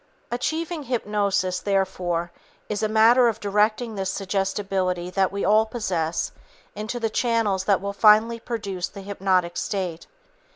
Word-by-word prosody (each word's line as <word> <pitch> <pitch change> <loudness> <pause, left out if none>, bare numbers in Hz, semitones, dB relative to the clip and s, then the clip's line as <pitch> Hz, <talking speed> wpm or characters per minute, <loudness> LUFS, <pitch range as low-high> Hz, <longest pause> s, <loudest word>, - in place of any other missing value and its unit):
Achieving 315 +6 -2
hypnosis, 205 -6 0
therefore, 180 -3 -1 0.4
is 210 - -2
a 215 - +1
matter 230 +3 +5
of 225 - -1
directing 215 +3 +1
this 195 -2 -2
suggestibility 190 -2 -1
that 190 0 +1
we 200 0 -2
all 215 +3 +4
possess 175 -8 -2 0.4
into 215 +4 -4
the 230 - 0
channels 220 -6 +1
that 195 -2 +3
will 200 0 -3
finally 220 +3 +5
produce 200 -6 -4
the 200 - -10
hypnotic 190 -3 0
state. 180 -5 -3
200 Hz, 135 wpm, -24 LUFS, 185-220 Hz, 0.4 s, matter